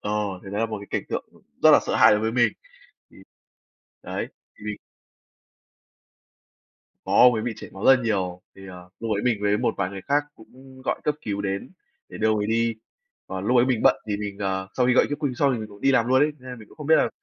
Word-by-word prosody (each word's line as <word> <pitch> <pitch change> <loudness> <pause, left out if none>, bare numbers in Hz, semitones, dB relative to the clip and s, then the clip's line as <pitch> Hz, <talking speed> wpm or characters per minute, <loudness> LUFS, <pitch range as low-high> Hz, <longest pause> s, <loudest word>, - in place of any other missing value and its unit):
ờ, 105 - -4 0.3
thì 95 - -8
đó 100 - -2
là 115 - +1
một 110 -2 -5
cái 100 - -10
cảnh - - -1
tượng - - -3 0.4
rất - - +8
là - - +7
sợ - - 0
hãi - - +7
đối 105 - +2
với 110 +1 -1
mình. 120 -3 +3 0.6
Thì, - - -19 0.9
đấy, - - -4 0.3
thì - - -13
mình 105 -1 -4 2.3
Có, - - -2
ông 125 0 +7
ấy 110 -1 -2
bị 120 -1 -2
chảy - - -9
máu 95 +2 -6
rất 135 - +8
là 130 - -3
nhiều, 95 -5 -1
thì, 95 0 -12
ờ, 90 -1 -11
lúc 115 -1 -3
ấy 100 - -2
mình 120 -4 +2
với 105 0 +2
một - - 0
vài 95 -2 -1
người 100 0 -8
khác 145 +1 +2
cũng 130 +3 -16
gọi - - -2
cấp 150 0 0
cứu 100 -1 -3
đến 100 -1 -4 0.4
để - - -9
đưa 110 - +1
ông 110 - +2
ấy 105 - -1
đi. 115 +1 +1 0.5
Còn 95 0 -5
lúc 125 +3 +3
ấy 120 - +5
mình 125 -4 0
bận - - +6
thì 105 -1 -1
mình, 100 -1 -5
ờ, 95 -1 -2
sau 125 - +1
khi 125 - +3
gọi - - +5
cấp 145 - -3
cứu 140 -4 0
xong 140 +1 +2
thì 120 - -3
mình 110 - -6
cũng 100 0 -15
đi 135 - +4
làm 120 -3 +2
luôn 130 +2 +4
ấy, 150 +1 +3
nên 125 -2 -9
mình 105 - -13
cũng - - -20
không 150 -2 -7
biết 160 - +6
là - - +3
110 Hz, 260 wpm, -24 LUFS, 100-125 Hz, 2.3 s, rất